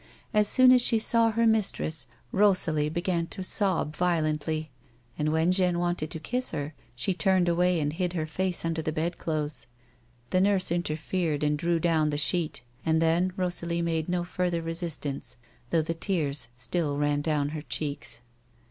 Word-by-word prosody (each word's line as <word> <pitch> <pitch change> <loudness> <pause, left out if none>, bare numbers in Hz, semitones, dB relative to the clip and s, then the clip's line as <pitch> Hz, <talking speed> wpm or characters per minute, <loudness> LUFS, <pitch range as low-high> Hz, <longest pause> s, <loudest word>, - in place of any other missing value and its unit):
As 210 -1 +4
soon 255 +2 +6
as 250 -1 +6
she 235 -1 +3
saw 230 +1 +3
her 230 +1 +1
mis 220 -3 +3
ti - - -6
ess 155 -3 -4 0.2
Rosalie 175 -7 +2
began 170 +1 -1
to 190 +1 -6
sob 185 -6 +1
violently, 155 -3 0 0.4
and 155 0 0
when 160 +3 +2
Jeanne 180 -2 +2
wanted 175 -3 -1
to 160 - -6
kiss 250 +10 -2
her, 145 +2 -4 0.2
she 155 +10 0
turned 185 -1 +2
away 175 0 +2
and 145 -1 -1
hid 180 +1 -1
her 160 -3 -1
face 180 +3 -1
under 165 -1 -1
the 155 - -2
bed 165 +3 -2
clothes. 155 -2 -3 0.6
The 185 - +3
nurse 195 -3 +3
interfered 165 -2 -1
and 150 0 +2
drew 170 +2 0
down 160 -2 +2
the 145 - -1
sheet, 155 -3 0 0.2
and 160 0 +2
then 165 +3 +2
Rosalie 170 -2 -1
made 165 -1 -1
no 175 -1 0
further 175 -1 -1
resistance, 165 -6 -4 0.3
though 165 -2 +2
the 165 - -2
tears 155 - -1
still 145 +3 -2
ran 145 0 +1
down 145 -2 0
her 155 0 -5
cheeks. 145 -6 -4
170 Hz, 175 wpm, -27 LUFS, 155-180 Hz, 0.6 s, soon